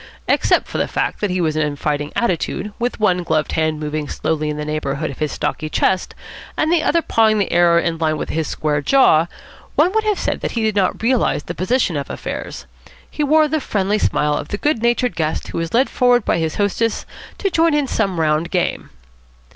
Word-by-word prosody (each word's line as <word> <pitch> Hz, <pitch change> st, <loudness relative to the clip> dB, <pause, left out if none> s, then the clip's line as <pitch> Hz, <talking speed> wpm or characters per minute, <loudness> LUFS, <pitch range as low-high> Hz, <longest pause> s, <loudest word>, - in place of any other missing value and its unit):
Except -, -, +2 dB
for -, -, -4 dB
the -, -, +1 dB
fact -, -, -2 dB
that 205 Hz, -, 0 dB
he 180 Hz, 0 st, -1 dB
was 160 Hz, -3 st, 0 dB
in 150 Hz, -2 st, 0 dB
fighting 150 Hz, 0 st, -2 dB
attitude, 195 Hz, -1 st, -1 dB
with 245 Hz, 0 st, -2 dB
one 185 Hz, -4 st, +2 dB
gloved 155 Hz, -3 st, 0 dB
hand 155 Hz, -1 st, 0 dB
moving 150 Hz, -1 st, -3 dB
slowly 155 Hz, -1 st, -1 dB
in 150 Hz, -, -3 dB
the 150 Hz, -, -4 dB
neighbourhood 150 Hz, 0 st, -2 dB
of 135 Hz, -, -11 dB
his 150 Hz, -2 st, -1 dB
stocky 155 Hz, +1 st, -3 dB
chest, 185 Hz, +3 st, 0 dB, 0.4 s
and 315 Hz, -, +1 dB
the 340 Hz, -, +3 dB
other 335 Hz, +1 st, +2 dB
pawing 220 Hz, -4 st, +3 dB
the 200 Hz, -, 0 dB
air 170 Hz, 0 st, +4 dB
on 170 Hz, -, +1 dB
a 170 Hz, -, +2 dB
line 155 Hz, -1 st, 0 dB
with -, -, -5 dB
his 160 Hz, -2 st, -1 dB
square 150 Hz, -1 st, -1 dB
jaw, 170 Hz, -, +4 dB, 0.5 s
one 360 Hz, -, +4 dB
would 440 Hz, 0 st, +2 dB
have 425 Hz, -2 st, +1 dB
said -, -, -2 dB
that -, -, -3 dB
he 230 Hz, -, -1 dB
did 215 Hz, -1 st, 0 dB
not 195 Hz, +2 st, 0 dB
realise 240 Hz, -, +1 dB
the -, -, -6 dB
position 190 Hz, -1 st, 0 dB
of 140 Hz, -1 st, -3 dB
affairs. -, -, -6 dB, 0.5 s
He 300 Hz, -, -2 dB
wore 310 Hz, +2 st, +4 dB
the 310 Hz, 0 st, -1 dB
friendly 205 Hz, -2 st, 0 dB
smile 150 Hz, -6 st, +1 dB
of -, -, -4 dB
the 205 Hz, -, -3 dB
good 295 Hz, -1 st, 0 dB
natured 240 Hz, +1 st, +1 dB
guest 155 Hz, -1 st, -2 dB
who -, -, -3 dB
is 165 Hz, -1 st, -3 dB
led 255 Hz, +4 st, +3 dB
forward 245 Hz, -3 st, +2 dB
by -, -, +1 dB
his 160 Hz, -1 st, -2 dB
hostess 210 Hz, +2 st, 0 dB, 0.3 s
to 390 Hz, -, -1 dB
join 330 Hz, -2 st, +3 dB
in 295 Hz, -1 st, +2 dB
some 195 Hz, -8 st, -1 dB
round 155 Hz, +1 st, +1 dB
game. 180 Hz, -1 st, -1 dB
180 Hz, 220 wpm, -19 LUFS, 155-240 Hz, 0.5 s, air